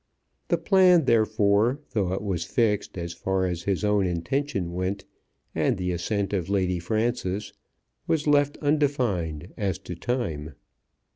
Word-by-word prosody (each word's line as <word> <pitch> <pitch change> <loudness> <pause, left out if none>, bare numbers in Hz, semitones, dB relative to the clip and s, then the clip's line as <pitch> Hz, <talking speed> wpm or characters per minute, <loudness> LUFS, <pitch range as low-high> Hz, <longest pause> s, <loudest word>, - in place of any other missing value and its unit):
The 170 - +2
plan, 180 -2 +5
therefore, 110 +2 +3
though 95 -5 0
it 95 - -3
was 95 -5 -1
fixed 105 0 0
as 85 -1 -4
far 95 +2 -1
as 90 -2 -2
his 100 +3 -1
own 105 -2 +2
intention 90 - -2
went 95 +2 -2 0.5
and - - +1
the 90 -1 -1
assent 100 +4 -2
of 95 -3 -1
Lady 95 -3 +1
Frances, 110 +1 -1 0.5
was 155 -2 +1
left 145 -1 +3
undefined 120 - 0
as 95 -4 -1
to - - -5
time. 85 - -3
100 Hz, 140 wpm, -26 LUFS, 90-120 Hz, 0.5 s, plan